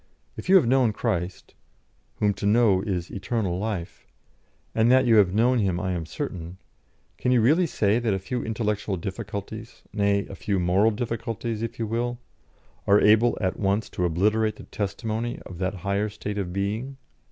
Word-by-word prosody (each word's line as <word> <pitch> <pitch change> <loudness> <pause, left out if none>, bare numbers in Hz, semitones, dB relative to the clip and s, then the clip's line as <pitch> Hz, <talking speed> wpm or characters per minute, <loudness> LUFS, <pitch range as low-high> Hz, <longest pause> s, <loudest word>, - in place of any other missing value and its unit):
If - - -8
you 195 - +7
have 180 -9 +7
known 125 -2 +3
Christ 95 -6 -3 0.6
(whom 105 -1 +1
to 100 +1 -3
know 105 -3 +4
is 90 -4 -3
eternal 100 -2 -2
life) 100 -5 -4 0.7
and 115 +2 +3
that 130 0 +5
you 115 -2 +5
have 100 -4 +5
known 120 +5 +3
Him 95 -4 0
I 95 - -2
am 85 -3 -3
certain 90 - -5 0.6
can 125 - +1
you 125 - +5
really 155 +10 +4
say 110 -5 +1
that 120 -2 0
a 95 - +1
few 120 +6 -4
intellectual 105 -3 -2
difficulties, 105 +5 -6
nay, 100 -1 +1
a - - -9
few 100 0 -1
moral 90 +5 +3
difficulties 115 0 -3
if 115 - -4
you 115 - -2
will, 120 +2 -2 0.7
are 100 +1 +6
able 110 +3 +4
at 95 -3 -1
once 100 +1 0
to 90 - -2
obliterate 105 +6 +1
the - - -11
testimony 110 +3 -3
of 90 - -9
that 95 +1 -1
higher 100 +2 0
state 105 0 -5
of 90 -3 -3
being? 105 +8 -3
105 Hz, 175 wpm, -25 LUFS, 95-115 Hz, 0.7 s, you